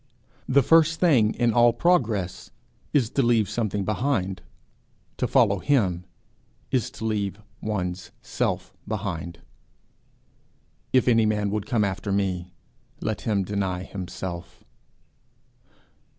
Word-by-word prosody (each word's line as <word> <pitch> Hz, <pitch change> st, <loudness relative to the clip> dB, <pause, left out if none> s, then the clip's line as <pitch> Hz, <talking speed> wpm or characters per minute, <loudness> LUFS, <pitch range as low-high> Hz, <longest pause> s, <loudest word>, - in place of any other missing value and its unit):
The 135 Hz, +1 st, +5 dB
first 165 Hz, +3 st, +4 dB
thing 125 Hz, -12 st, +4 dB
in 120 Hz, -2 st, +2 dB
all 120 Hz, +1 st, +6 dB
progress 110 Hz, -, 0 dB, 0.4 s
is 125 Hz, -6 st, +2 dB
to 140 Hz, -, +1 dB
leave 120 Hz, -4 st, +3 dB
something 105 Hz, -2 st, -2 dB
behind; 105 Hz, -4 st, -1 dB, 0.8 s
to -, -, 0 dB
follow -, -, +3 dB
him 95 Hz, -11 st, +1 dB, 0.7 s
is 130 Hz, -4 st, +1 dB
to 110 Hz, -, -6 dB
leave 100 Hz, -3 st, -1 dB, 0.2 s
one's 90 Hz, -4 st, -3 dB
self -, -, -2 dB
behind. 90 Hz, -5 st, -4 dB, 1.5 s
'If 130 Hz, -1 st, +3 dB
any 115 Hz, -3 st, +4 dB
man 105 Hz, -1 st, 0 dB
would 105 Hz, 0 st, -2 dB
come 115 Hz, -3 st, +2 dB
after 100 Hz, +1 st, -2 dB
me, 95 Hz, -3 st, -1 dB, 0.5 s
let 110 Hz, -, -3 dB
him 100 Hz, -2 st, +2 dB
deny 95 Hz, -2 st, -2 dB
himself.' 90 Hz, -2 st, -7 dB
105 Hz, 115 wpm, -25 LUFS, 95-120 Hz, 1.5 s, all